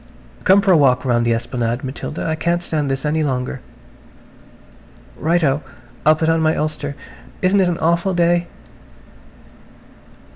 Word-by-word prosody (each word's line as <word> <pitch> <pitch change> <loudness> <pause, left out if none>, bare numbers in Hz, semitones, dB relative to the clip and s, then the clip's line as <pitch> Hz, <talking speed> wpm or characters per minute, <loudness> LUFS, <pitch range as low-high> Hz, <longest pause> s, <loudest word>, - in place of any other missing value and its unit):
"Come 195 +1 +6
for 195 -1 +2
a 175 - +6
walk 130 -3 +3
round 120 -2 +1
the 115 - +3
esplanade, 120 +1 -3
Matilda. 135 +3 -5
I 160 - 0
can't 170 +2 -1
stand 150 -4 -2
this 135 +2 -2
any 155 +1 0
longer." 130 -2 -2 1.6
"Right 165 +4 0
o. 140 0 +1 0.5
I'll 155 - +7
put 160 +1 -1
on 165 0 +2
my 155 0 +2
ulster. 150 -2 -3 0.5
Isn't 190 +2 +3
it 180 - +2
an 170 - -1
awful 170 +3 +1
day!" 175 0 +2
155 Hz, 150 wpm, -19 LUFS, 135-170 Hz, 1.6 s, I'll